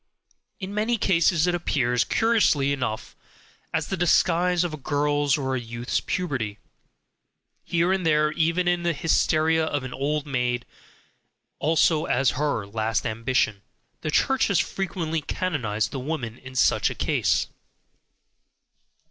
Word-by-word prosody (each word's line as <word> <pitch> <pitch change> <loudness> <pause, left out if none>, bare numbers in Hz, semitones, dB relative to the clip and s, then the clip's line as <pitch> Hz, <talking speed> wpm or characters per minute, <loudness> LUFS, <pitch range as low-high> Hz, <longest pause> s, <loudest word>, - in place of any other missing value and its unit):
In 195 0 -6
many 220 +3 0
cases 170 -4 +2
it 180 - +1
appears, 125 -8 +1
curiously 175 -12 +2
enough, 125 -6 -4 0.6
as - - -2
the 195 - -1
disguise 175 0 +2
of 175 -3 -3
a - - -5
girl's 145 0 +1
or 135 -2 -2
youth's 120 0 -3
puberty; 125 - -3 1.1
here 175 +2 +1
and 190 -1 -1
there 150 -2 +3
even 165 +3 0
as 175 0 +2
the 170 0 +1
hysteria 160 0 +2
of 145 -3 -2
an 130 - -6
old 145 +2 -1
maid, 125 -3 -1 0.9
also 160 +1 +2
as 130 -3 +2
her 145 -6 -1
last 110 +3 -2
ambition. 115 -2 0 0.4
The 155 - -3
Church 265 - +2
has 200 - +2
frequently 170 -4 -2
canonized 115 - -2
the 135 - -4
woman 130 -4 -4
in 130 0 -11
such - - +3
a - - -6
case. - - +1
150 Hz, 135 wpm, -25 LUFS, 125-175 Hz, 1.1 s, there